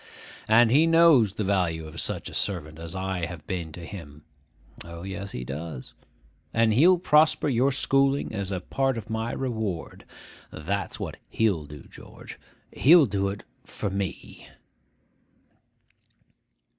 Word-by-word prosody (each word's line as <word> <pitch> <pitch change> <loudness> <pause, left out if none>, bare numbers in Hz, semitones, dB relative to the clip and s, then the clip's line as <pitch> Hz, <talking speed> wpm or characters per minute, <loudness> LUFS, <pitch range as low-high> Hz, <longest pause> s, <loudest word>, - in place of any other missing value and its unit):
and 115 +1 +5
he 155 +5 +5
knows 165 - +5
the 110 - -2
value 90 -5 0
of 80 - -6
such - - -2
a - - -9
servant 80 -5 -3
as 85 +1 -7
I 95 -2 -2
have 85 -4 -9
been 85 -4 -4
to 85 +1 -8
him 75 -6 -10 0.6
(O, 85 0 -9
yes, 100 +1 -6
he 60 - -6
does!); 70 +1 -7 0.6
and 115 -1 +3
he'll 175 +10 +5
prosper 155 -3 +3
your 135 0 +2
schooling 135 0 +1
as 100 -2 -4
a 90 -2 -3
part 135 +5 -1
of 110 0 -7
my 110 +1 -2
reward. 110 -9 -4 0.5
That's 90 +4 -4
what - - -5
he'll 100 -9 0
do, 75 -1 -11
George. - - -13 0.3
He'll 160 +2 +6
do 100 -3 -1
it 100 +1 -5 0.2
for 100 - -5
me. 100 -2 -5
100 Hz, 145 wpm, -26 LUFS, 85-120 Hz, 0.6 s, He'll